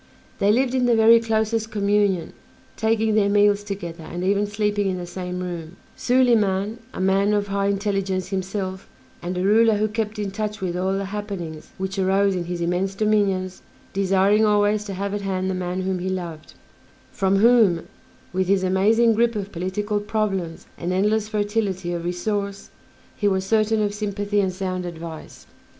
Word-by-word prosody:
They 200 +1 +4
lived 250 +3 +2
in 255 -1 +2
the 240 - +4
very 225 +1 +7
closest 220 0 0
communion, 205 -4 +1 0.4
taking 220 0 +1
their 210 -2 +3
meals 205 0 +3
together, 175 -5 -6
and 175 +2 -5
even 200 +2 +1
sleeping 205 -1 0
in 185 - -2
the 175 - -5
same 180 0 -5
room, 175 -1 -6 0.2
Soliman, 225 -4 +2
a - - -8
man 195 +2 +2
of 205 -1 -1
high 200 0 0
intelligence 195 -2 -1
himself, 190 0 -4 0.3
and 180 +1 -4
a 180 - -1
ruler 220 +2 +4
who 215 +1 +1
kept 215 0 -3
in 205 -2 -3
touch 210 +1 -4
with 180 -2 -3
all 190 +2 0
the 195 0 -2
happenings 180 -7 -6
which 190 +1 -3
arose 195 +1 +2
in 175 -1 -2
his 175 0 -4
immense 180 +3 -1
dominions, 195 -3 0 0.3
desiring 195 +2 +3
always 210 0 +2
to 200 -2 -5
have 200 +1 -3
at 205 - -2
hand 190 -1 -1
the - - -1
man 185 0 -3
whom 185 -1 -1
he 185 +1 -3
loved; 170 -4 -6 0.6
from 195 -1 +1
whom, 210 -5 +4 0.5
with 185 0 0
his 195 0 +2
amazing 215 +5 +3
grip 235 +1 +2
of 200 -1 -4
political 205 +4 -2
problems 205 -6 -2
and 175 +1 -2
endless 210 +3 +1
fertility 205 -4 -1
of 170 -1 -3
resource, 200 +3 -3 0.4
he 205 - 0
was 190 -1 +1
certain 215 +1 +2
of 205 -1 -1
sympathy 205 0 -1
and 190 -1 0
sound 185 -1 -3
advice. 165 -2 -8
200 Hz, 175 wpm, -23 LUFS, 185-210 Hz, 0.6 s, very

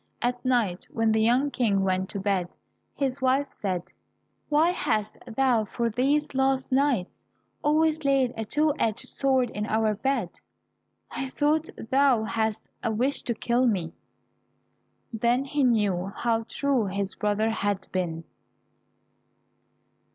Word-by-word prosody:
At 245 0 -1
night 235 -8 0
when 225 -1 +1
the 220 0 +2
young 250 +6 +3
King 205 -7 +1
went 185 0 0
to 200 - -4
bed, 190 -3 0 0.5
his 270 -1 -1
wife 265 +2 +1
said, 185 -4 -3 0.6
"Why 310 +3 +4
hast 215 - -1
thou 240 -2 +2
for 230 +3 -2
these 280 +6 +1
last 265 0 +1
nights 260 -8 +1 0.5
always 310 +1 +2
laid 270 -3 +2
a 225 - -3
two 300 +6 +1
edged 220 -1 -1
sword 265 -3 +1
in 210 +1 -3
our 220 0 +1
bed? 225 -4 -1 0.8
I 270 - -3
thought 305 +3 +1 0.2
thou 265 -4 +4
hadst 220 -1 -2
a 230 - -1
wish 255 +6 +1
to 235 - -2
kill 245 +3 +1
me." 180 -7 -1 1.2
Then 240 +4 +1
he 285 +1 0
knew 200 -6 +1
how 230 -1 0
true 270 -7 0
his 195 0 -2
brother 210 +1 0
had 205 -3 -1
been. 170 -3 -2
235 Hz, 135 wpm, -26 LUFS, 210-270 Hz, 1.2 s, Why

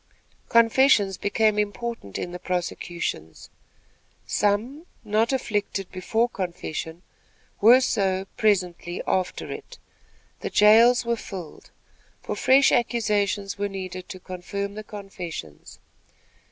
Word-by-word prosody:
Confessions 230 -4 +4
became 215 0 +2
important 210 - -3
in 175 - -4
the 180 - -7
prosecutions. 175 - -4 0.7
Some, 230 - 0 0.2
not 215 +2 +1
afflicted 205 -6 -2
before 220 +6 0
confession, 170 -4 -5 0.6
were 240 +5 +7
so, 195 -6 0
presently, 180 -4 0
after 185 -1 -1
it. - - -9 0.6
The - - -4
jails 230 +4 +6
were 235 0 0
filled; 180 -8 -9 0.5
for - - -3
fresh 270 +1 +5
accusations 210 -4 0
were 205 0 -1
needed 185 -2 -7
to 185 - -7
confirm 200 +2 -5
the 215 +1 -7
confessions. 180 - -8
205 Hz, 105 wpm, -25 LUFS, 185-225 Hz, 0.7 s, were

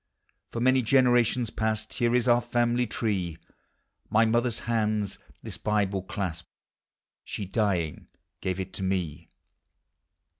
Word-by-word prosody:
For 115 - -4
many 130 +2 +4
generations 125 -1 +3
past 110 -1 -2
Here 120 0 +1
is 125 0 +2
our 120 0 +5
family 120 0 +1
tree; 95 -7 -1 0.7
My 110 +1 +4
mother's 120 +1 +1
hands 110 -3 0 0.2
this - - -7
Bible 100 -2 0
clasped, 90 -3 -4 0.7
She, 100 - -5
dying, 95 -6 -1 0.3
gave 95 0 -2
it 95 +1 -5
me. 95 -5 -2
110 Hz, 115 wpm, -27 LUFS, 95-120 Hz, 0.7 s, our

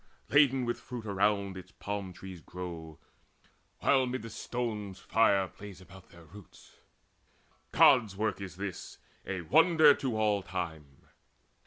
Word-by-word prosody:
Laden 135 -3 +4
with 120 0 -2
fruit 120 -2 -8
around 100 -1 0
it 95 0 -11
palm 100 -2 -4
trees 90 -1 -10
grow, 85 -3 -8 0.8
While 130 -2 +3
mid 130 0 -4
the 115 - -8
stones 110 -4 -4
fire 100 -4 +2
plays 100 -1 -12
about 95 0 -15
their 85 -1 -16
roots. 95 +3 -16 0.9
Gods' 110 -7 +5
work 110 -1 -1
is 95 -4 -7
this, 95 -1 -6 0.3
a 95 -2 -3
wonder 155 - +6
to 130 -5 -3
all 105 -2 +2
time. 80 -6 -6
100 Hz, 135 wpm, -30 LUFS, 90-115 Hz, 0.9 s, wonder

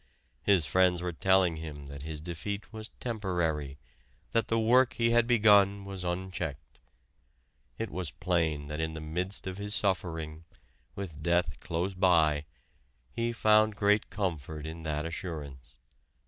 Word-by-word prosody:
His 95 -6 +3
friends 90 +4 +3
were 90 -1 -2
telling 95 -1 +3
him 75 -3 -7
that 70 0 -9
his 80 +1 -6
defeat 90 +7 -5
was 110 0 -7
temporary, 85 - -2 0.5
that 115 0 +1
the 115 - +1
work 125 +2 +4
he 115 -1 +1
had 120 0 +4
begun 100 -4 +5
was 95 -2 -6
unchecked. 90 -8 -4 1.0
It - - -4
was 90 +1 -3
plain 80 -3 0
that 75 +1 -5
in 80 0 -2
the - - -5
midst 90 +5 -3
of 95 +1 -5
his 105 +1 +2
suffering, 80 -6 0 0.5
with 85 -7 -6
death 85 +2 +1
close 85 +4 -2
by, 80 -5 +3 0.7
he 115 - -1
found 110 -2 +4
great 105 +1 +2
comfort 80 -7 -3
in 80 +1 -7
that 75 -1 -2
assurance. 75 -7 -6
90 Hz, 145 wpm, -30 LUFS, 80-100 Hz, 1.0 s, begun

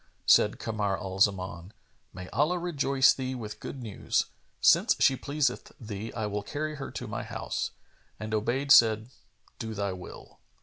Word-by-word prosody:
Said - - +5
Kamar 105 -3 -1
al 95 -2 -6
Zaman, 95 -2 0 0.4
"May 90 0 -9
Allah 155 +6 +1
rejoice 140 -6 +3
thee 130 -1 -4
with 110 -4 -7
good 135 -3 -7
news! 110 -4 -1 0.3
Since - - +5
she 135 - +5
pleaseth 140 -1 -2
thee, 110 -1 -6
I 110 - -2
will 105 0 -2
carry 150 +7 -4
her 135 - -6
to - - -6
my - - -4
house;" - - -3 0.5
and 110 0 -5
Obayd 125 +6 0
said, 110 -1 +6 0.5
"Do 110 -1 -5
thy 100 -1 -2
will." 90 -1 -11
110 Hz, 160 wpm, -28 LUFS, 100-135 Hz, 0.5 s, said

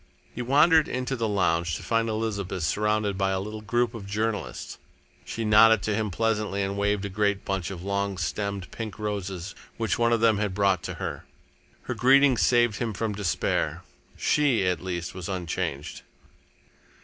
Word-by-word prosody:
He 120 - -5
wandered 150 +5 +5
into 130 +1 -2
the 115 -2 -1
lounge 85 -5 +1
to - - -7
find 115 0 +1
Elizabeth 100 -5 -2
surrounded 105 +3 0
by 95 0 +2
a 95 0 0
little 105 +2 -6
group 120 +2 0
of 105 -4 -8
journalists. 105 +1 -3 0.5
She 115 - -4
nodded 110 -1 +6
to 110 - 0
him 105 0 -1
pleasantly 105 0 0
and 100 0 -2
waved 100 0 0
a - - -1
great 100 0 0
bunch 95 -3 -2
of 90 -3 -7
long 100 0 -1
stemmed 100 +1 -3
pink 110 -3 -6
roses 100 -3 -4 0.2
which 115 0 -1
one 115 0 +3
of 115 - +3
them 110 -2 +3
had 105 -3 -1
brought 100 -3 +2
to - - -4
her. - - -5 0.6
Her 125 - -3
greeting 135 +3 +5
saved 120 -2 +3
him 115 -3 -2
from 110 +1 -2
despair. 100 -4 -1 0.3
She, 135 -9 +2
at 90 -3 0
least, 90 -2 -4
was 90 -1 -6
unchanged. 85 -6 -3
105 Hz, 175 wpm, -26 LUFS, 95-115 Hz, 0.6 s, nodded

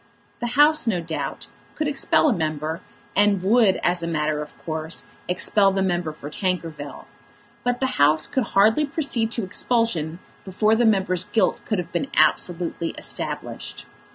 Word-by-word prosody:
The 240 - -2
House, 300 -2 +5
no 195 -6 +1
doubt, 165 -1 -5 0.3
could 310 - -1
expel 295 +2 +2
a 275 - +3
member, 155 -2 -3 0.3
and 200 -2 +3
would, 210 -1 +4
as 175 0 +3
a 170 - -3
matter 155 -2 -1
of 150 - -10
course, 160 0 -2 0.2
expel 195 +2 +3
the 195 0 0
member 175 -3 -1
for 150 -1 -10
Tankerville, 165 -4 -4 0.6
but 245 0 0
the 265 - +1 0.2
House 150 +2 +4
could 260 -3 -1
hardly 220 +9 +5
proceed 275 -6 0
to 230 - -2
expulsion 185 -5 0 0.3
before 210 +3 +1
the 235 +2 +3
member's 190 -4 +2
guilt 225 - +1
could 215 - -1
have 180 - -4
been 280 - -2
absolutely 170 -1 +1
established. - - -5
185 Hz, 155 wpm, -23 LUFS, 165-225 Hz, 0.6 s, House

